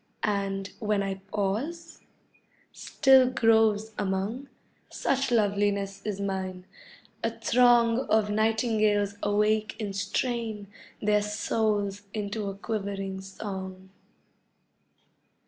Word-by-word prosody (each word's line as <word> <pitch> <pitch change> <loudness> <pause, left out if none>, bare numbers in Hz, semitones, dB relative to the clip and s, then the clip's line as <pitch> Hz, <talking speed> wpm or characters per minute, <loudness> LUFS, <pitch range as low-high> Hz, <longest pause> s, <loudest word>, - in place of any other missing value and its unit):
And, 195 -1 -1
when 210 -2 0
I 195 -1 -4
pause, 225 - -3 0.7
still 265 -2 +4
groves 220 -3 +3
among, 205 +7 -2 0.4
(Such 275 0 0
loveliness 200 -3 +1
is 205 -2 -3
mine) 190 -2 -3 0.6
a - - +2
throng 240 -1 +4
Of 215 -1 +3
nightingales 215 -2 +1
awake 210 +1 +1
and 205 -3 -4
strain 220 0 -2 0.4
Their 210 0 +3
souls 210 -1 -1
into 210 0 -3
a 195 - -6
quivering 195 -2 -4
song. 190 -1 -7
210 Hz, 95 wpm, -27 LUFS, 195-220 Hz, 0.7 s, still